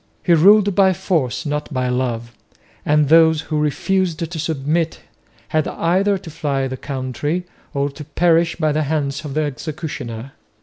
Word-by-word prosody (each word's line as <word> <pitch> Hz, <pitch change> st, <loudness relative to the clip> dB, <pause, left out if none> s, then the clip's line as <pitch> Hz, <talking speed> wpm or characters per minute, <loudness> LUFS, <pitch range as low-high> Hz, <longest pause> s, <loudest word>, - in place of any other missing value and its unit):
He 175 Hz, -, +4 dB
ruled 200 Hz, +5 st, +6 dB
by 190 Hz, 0 st, +4 dB
force, 170 Hz, -7 st, -1 dB
not 150 Hz, +1 st, -3 dB
by 130 Hz, -2 st, -1 dB
love; 120 Hz, -2 st, -2 dB, 0.5 s
and 150 Hz, 0 st, +3 dB
those 160 Hz, 0 st, +5 dB
who 155 Hz, -1 st, -2 dB
refused 170 Hz, +4 st, 0 dB
to 165 Hz, -, -5 dB
submit 160 Hz, +1 st, -1 dB, 0.5 s
had 155 Hz, -1 st, +1 dB
either 195 Hz, +4 st, +1 dB
to 185 Hz, -4 st, -10 dB
fly 140 Hz, -3 st, -1 dB
the 130 Hz, -, -4 dB
country 140 Hz, +6 st, -3 dB, 0.3 s
or 140 Hz, 0 st, +1 dB
to 150 Hz, +2 st, -9 dB
perish 165 Hz, +2 st, +2 dB
by 155 Hz, -2 st, +1 dB
the 155 Hz, +1 st, 0 dB
hands 145 Hz, -1 st, -1 dB
of 140 Hz, -2 st, -6 dB
the 155 Hz, -, +2 dB
executioner. 140 Hz, -4 st, -5 dB
155 Hz, 160 wpm, -20 LUFS, 140-170 Hz, 0.5 s, ruled